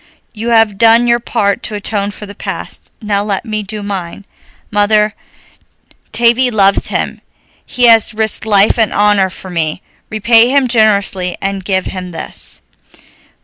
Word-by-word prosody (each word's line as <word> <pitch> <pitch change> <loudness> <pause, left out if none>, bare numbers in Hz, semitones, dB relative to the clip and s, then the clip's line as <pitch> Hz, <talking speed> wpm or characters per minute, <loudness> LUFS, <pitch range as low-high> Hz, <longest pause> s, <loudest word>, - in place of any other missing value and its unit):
You 230 +1 -5
have 225 -3 +2
done 230 +1 +5
your 235 0 +2
part 205 -4 -1
to 215 - -3
atone 205 -1 -2
for 210 +1 -9
the 200 - -10
past, - - -7
now 205 -1 0
let 200 0 -3
me 215 -2 -3
do 210 +1 -7
mine. 195 -1 -6 0.5
Mother, 210 0 +2 1.0
Tavie 240 +2 +3
loves 200 -4 +2
him, - - -3 0.5
he 250 - -2
has 225 -1 +5
risked 220 0 -1
life 205 +2 +4
and 220 -3 +2
honor 205 -2 +2
for 185 0 -8
me. 165 +1 -3 0.3
Repay 225 +2 +3
him 275 -1 +2
generously 200 -5 +1
and 195 0 -3
give 190 -1 -1
him 185 -1 -6
this." 165 -2 -5
210 Hz, 150 wpm, -13 LUFS, 195-225 Hz, 1.0 s, done